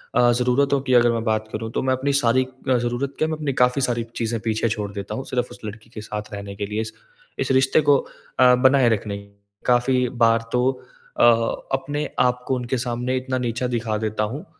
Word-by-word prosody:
अ, 120 -1 +5
ज़रूरतों 135 +3 +2
की 130 -2 -1
अगर 120 -1 +5
मैं 115 -1 -1
बात 110 -1 0
करूँ, 110 +1 -4
तो - - -1
मैं 130 0 +2
अपनी 140 +2 0
सारी 125 +1 +3 0.3
अ, 125 - +4
ज़रूरत 120 +3 -2
क्या 155 - +2
मैं 155 -1 -3
अपनी 145 -3 -2
काफ़ी 125 +2 +2
सारी 120 -2 0
चीज़ें 115 -1 -2
पीछे 110 0 0
छोड़ 105 -1 -3
देता 100 +1 -5
हूँ 130 - -5
सिर्फ़ 125 -1 -2
उस 120 - -12
लड़की 110 +2 -9
के 110 -2 -8
साथ 105 -1 -6
रहने 100 0 -6
के 100 0 -3
लिए, 105 +2 -2
इस 110 - -6 0.5
इस - - 0
रिश्ते 130 +3 +4
को 140 - +7 0.4
अ, 125 -1 +7
बनाए 130 -1 +4
रखने 105 -2 -1 0.5
काफ़ी 125 +1 +3 0.2
बार 115 0 +2
तो 125 +1 +2 0.5
अ, - - +5 0.5
अपने 145 +2 -2
आप 125 0 +2
को 130 - +1
उनके 125 +1 -2
सामने 125 +1 -2
इतना 130 0 -2
नीचा 125 0 -2
दिखा 110 -2 -1
देता 110 0 -2
हूँ, 130 +9 -4
अ, - - -20
120 Hz, 220 wpm, -22 LUFS, 110-130 Hz, 0.5 s, को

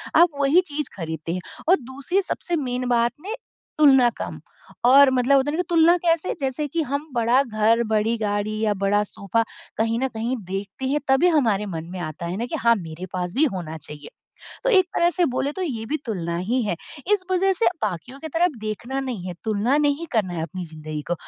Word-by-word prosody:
आप 345 +2 +7
वही 285 +6 +5
चीज़ 295 -1 -3
ख़रीदते 160 -1 -4
हैं। 180 - -3 0.3
और 370 - +8
दूसरी 275 +10 -1
सबसे 355 -2 -3
मेन 255 -4 -2
बात 235 -1 +3
ने 420 +6 -4 0.4
तुलना 270 -5 +6
कम - - -5 0.5
और 275 +2 +8
मतलब 260 +2 +4
होता 270 +2 +1
है - - -2
ना - - -3
कि - - -3
तुलना 335 0 +5
कैसे? 335 0 +1
जैसे 270 +2 -1
कि 330 +4 -1
हम 285 +2 -3
बड़ा 240 +2 +3
घर, 225 -1 +2
बड़ी 220 +1 +1
गाड़ी 210 0 -1
या 215 -1 +2
बड़ा 200 +1 +1
सोफ़ा 205 +2 -1 0.3
कहीं 225 +1 +1
न 265 - +1
कहीं 230 +2 -2
देखते 195 +6 -5
हैं 295 +2 +1
तभी 270 +6 +4
हमारे 225 - +2
मन 165 -4 -5
में 185 - -6
आता 155 0 -5
है 175 +2 -3
ना 235 - -2
कि 285 - -4
हाँ 235 -1 +4
मेरे 170 -2 -7
पास 180 -1 -3
भी 295 +4 +4
होना 160 -3 -5
चाहिए। 150 -1 -10 0.6
तो - - +3
एक 375 -5 +5
तरह 345 0 +3
से 355 0 +1
बोले 270 +1 -1
तो 375 - -4
ये 245 -11 -3
भी 300 - -1
तुलना 170 -6 -2
ही 235 +8 0
है। 205 -6 -1 0.4
इस 410 -2 +3
वजह 380 +1 +3
से 455 - +1 0.2
बाकियों 215 +6 -3
की 315 - -6
तरफ 335 +3 +2
देखना 220 +5 -4
नहीं 245 -9 -4
है, 180 - -5
तुलना 220 +5 +1
नहीं 295 +2 +1
करना 200 -7 0
है 165 - -2
अपनी 180 +2 -5
ज़िंदगी 155 -1 -6
को। - - +3
235 Hz, 215 wpm, -23 LUFS, 195-290 Hz, 0.6 s, और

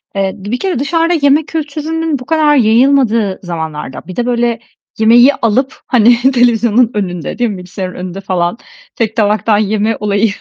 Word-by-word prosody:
eee, 195 -1 -1
bir 205 +6 -4
kere 370 -9 -2
dışarıda 330 +4 0
yeme 285 +2 +3
kültürünün 315 0 -3
bu 250 - -10
kadar 305 -1 +2
yayılmadığı 230 -4 +2
zamanlarda, 160 -6 -6
bir 185 - -8
de 245 - -1
böyle 240 -1 0 0.4
yemeği 240 +5 +5
alıp, 255 +4 -1
hani, 240 -1 +4
televizyonun 240 -1 +2
önünde, 180 -5 -4
değil 240 -1 +1
mi, 200 - -5
bilgisayarın 180 0 -7
önünde 185 +1 -7
falan 180 0 -2 0.4
tek 220 -2 -2
tabaktan 210 0 +1
yeme 215 +1 0
olayı 210 +1 0
230 Hz, 155 wpm, -13 LUFS, 200-265 Hz, 0.4 s, yemeği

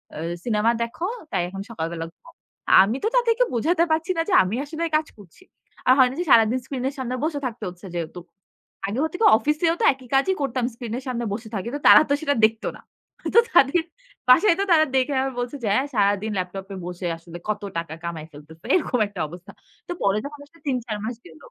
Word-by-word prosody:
আ - - -7 0.3
cinema 225 0 +2
দেখো। 235 +9 -5 0.3
তাই 190 -3 0
এখন 195 +1 -7
সকাল 165 -8 -3
বেলা 165 -1 -4
ঘুমাও।" 335 - -19 0.5
আমি 215 +6 -1
তো - - +2
তাদেরকে 475 0 +3
বোঝাতে 325 +8 +2
পারছি 325 +4 +1
না - - +2
যে - - 0
আমি 185 +5 -3
আসলে 315 +3 -5
কাজ 310 - -3
করছি। 200 - -17 0.4
আর 255 - +8
হয় 260 -2 +6
না 260 - -7
যে 355 - -1
সারাদিন 230 +3 +5
স্ক্রিন 265 -2 -5
এর - - -10
সামনে 255 -1 -3
বসে 310 -2 -2
থাকতে 235 -2 -5
হচ্ছে 175 +2 -13
যেহেতু। 170 +1 -4 0.7
আগে 220 +6 -3
হত 315 - -2
কি 450 - +3
অফিসেও 305 +5 +1
তো - - +3
একই 260 -1 -16
কাজই 375 +8 +3
করতাম। 255 -3 -1
স্ক্রিনের 240 +2 -6
সামনে 240 -2 -2
বসে 220 +1 -6
থাকি। 200 +4 -3
তো - - -3
তারা - - +10
তো - - +3
সেটা 285 -2 +1
দেখত 220 +1 -1
না। - - -18 0.5
তো - - +10
তাদের 320 +2 +4 0.5
বাসায় 335 +8 +6
তো 395 - +2
তারা 315 -2 +6
দেখে 265 +2 +2 0.3
বলছে 245 +3 -3
যে, - - -1
"হ্যাঁ 270 +2 +1
সারাদিন 205 +1 +1
ল্যাপটপে 190 +2 -5
বসে 180 0 -5
আসলে 165 +1 -11
কত 210 -1 -1 0.2
টাকা 165 -2 -4
কামায় 160 -2 -5
ফেলতেছে।" 155 +3 -15
এরকম 280 -8 0
একটা 200 -2 -10
অবস্থা। 175 +3 -12 0.4
তো - - -5
পরে 200 +1 +2
যখন 290 0 -8
আসলে 335 +3 -24
৩ 260 -2 +1
৪ 215 -3 -3
মাস 235 - -3
গেল 160 - -14
240 Hz, 215 wpm, -23 LUFS, 195-295 Hz, 0.7 s, তারা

